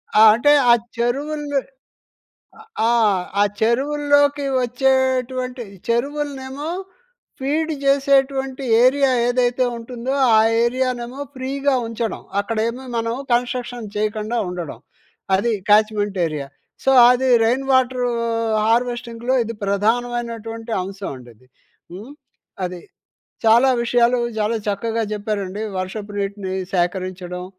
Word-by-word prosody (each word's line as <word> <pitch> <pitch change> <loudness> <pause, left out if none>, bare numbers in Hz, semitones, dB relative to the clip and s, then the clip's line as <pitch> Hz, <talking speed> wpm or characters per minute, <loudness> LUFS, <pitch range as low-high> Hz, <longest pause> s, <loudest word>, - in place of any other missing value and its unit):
ఆ! 215 - +6
అంటే 265 +6 +3 0.2
ఆ - - +9 0.2
చెరువుల్ 290 +5 -2 1.4
ఆహ్, 215 -6 +3 0.2
ఆ - - +6 0.2
చెరువుల్లోకి 285 +4 +2 0.2
వచ్చేటువంటి 255 0 0 0.2
చెరువులనేమో 280 +3 -2 0.7
ఫీడ్ 305 +4 -1
చేసేటువంటి 275 -1 +2 0.2
ఏరియా 270 +2 +4 0.2
ఏదైతే 245 0 +1
ఉంటుందో 240 +2 -5 0.2
ఆ - - +6 0.2
ఏరియానేమో 250 +1 -2 0.2
ఫ్రీగా 275 +2 -1
ఉంచడం. 230 -1 -4 0.2
అక్కడేమో 230 +4 -2
మనం 230 0 -1 0.2
కన్స్ట్రక్షన్ 245 -1 -1
చేయకుండా 215 +2 -2
ఉండడం, 175 -9 -6 0.6
అది 230 +5 0 0.2
క్యాచ్మెంట్ 210 -1 +3
ఏరియా. 150 -3 -5 0.4
సో, - - +2 0.2
అది 255 +1 +1 0.2
రెయిన్ 250 +4 +1
వాటరు 255 -1 +2 0.6
హార్వెస్టింగ్‌లో 240 +1 0
ఇది 230 +1 -5
ప్రధానమైనటువంటి 230 +2 -2
అంశం 195 +1 -6
అండి 125 -1 -14
అది. 125 +4 -26 0.5
హ్మ్, 210 +9 -9 0.5
అది. 180 -1 -6 0.6
చాలా 230 +4 +5
విషయాలు 240 +1 +2 0.2
చాలా 215 +2 0
చక్కగా 225 +2 -1
చెప్పారండి. 205 -1 -3 0.2
వర్షపు 200 +3 -5
నీటిని 200 -1 -3 0.2
సేకరించడం, 180 0 -2
235 Hz, 100 wpm, -20 LUFS, 210-260 Hz, 1.4 s, ఆ